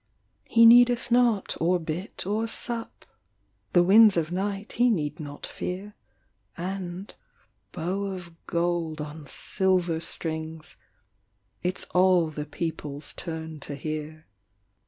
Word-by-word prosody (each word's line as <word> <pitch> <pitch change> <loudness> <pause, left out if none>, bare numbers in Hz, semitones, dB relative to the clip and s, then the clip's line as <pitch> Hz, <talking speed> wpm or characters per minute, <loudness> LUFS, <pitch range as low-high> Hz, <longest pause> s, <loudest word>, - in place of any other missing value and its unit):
He 230 0 +5
needeth 245 +1 +6
not 235 -4 +3
or 175 +2 +3
bit 170 +5 -5
or 215 +3 0
sup, 230 0 -5 0.7
The 175 - +6
winds 205 +1 +7
of 160 0 0
night 195 +2 -3
he 245 +1 +3
need 150 -9 -1
not 145 -2 -7
fear, 195 +3 -5 0.6
And 185 +1 -5 0.6
(bow 185 +4 -2
of 180 -3 -6
gold 170 -2 -1
on 150 0 -7
silver 180 -1 0
strings) 160 -1 -5 0.9
It 180 +1 -1
s - - -2
all 180 -3 +4
the 150 -1 -5
peoples 150 -2 -4
turn 160 -2 -6
to 145 - -6
hear. 155 +2 -5
175 Hz, 120 wpm, -26 LUFS, 160-195 Hz, 0.9 s, winds